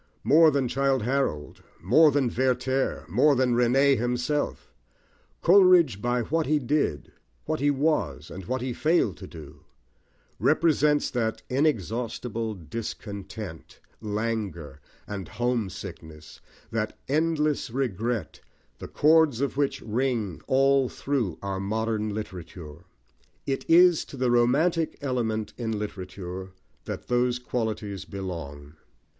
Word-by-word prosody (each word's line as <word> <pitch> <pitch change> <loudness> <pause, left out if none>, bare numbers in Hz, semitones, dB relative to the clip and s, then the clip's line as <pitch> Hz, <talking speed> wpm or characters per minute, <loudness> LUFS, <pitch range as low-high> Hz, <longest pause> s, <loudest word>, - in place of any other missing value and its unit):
More 160 +2 +6
than 140 -3 0
Childe 135 0 +1
Harold, 120 - -2 0.2
more 160 -1 +5
than 140 -2 +1
Werther, 130 +1 0
more 135 - +4
than 125 -1 +2
René 130 +4 +4
himself, 125 +5 -2 0.7
Coleridge, 180 - +6
by 120 +1 0
what 160 +5 -1
he 155 +2 +3
did, 140 - -1 0.3
what - - -2
he 145 +2 +2
was, 135 - 0
and 90 +2 -8
what 130 +5 -2
he 130 -1 -2
failed 155 - +1
to - - -9
do, 75 -2 -11 0.8
represents 150 -1 +2
that 115 -3 -2
inexhaustible 115 - -1
discontent, 100 0 -7 0.2
languor, 105 -9 -3 0.2
and 100 -4 -6
homesickness, 95 -10 -4 0.3
that 110 -1 -2
endless 155 -1 0
regret, 115 -3 -2 0.4
the - - -7
chords 155 -4 +4
of 140 0 -1
which 140 0 0
ring 115 - -1
all 135 -1 +3
through 120 - -2
our 95 -1 -3
modern 110 +2 -1
literature. 90 -6 -8 0.6
It 135 -1 -3
is 175 0 +6
to 140 - -11
the 125 -1 +1
romantic 150 +8 +2
element 115 -6 -2
in 110 -2 -2
literature 95 -2 -6 0.3
that - - -6
those 125 0 +1
qualities 110 -5 -4
belong. 80 -7 -7
120 Hz, 115 wpm, -26 LUFS, 100-140 Hz, 0.8 s, More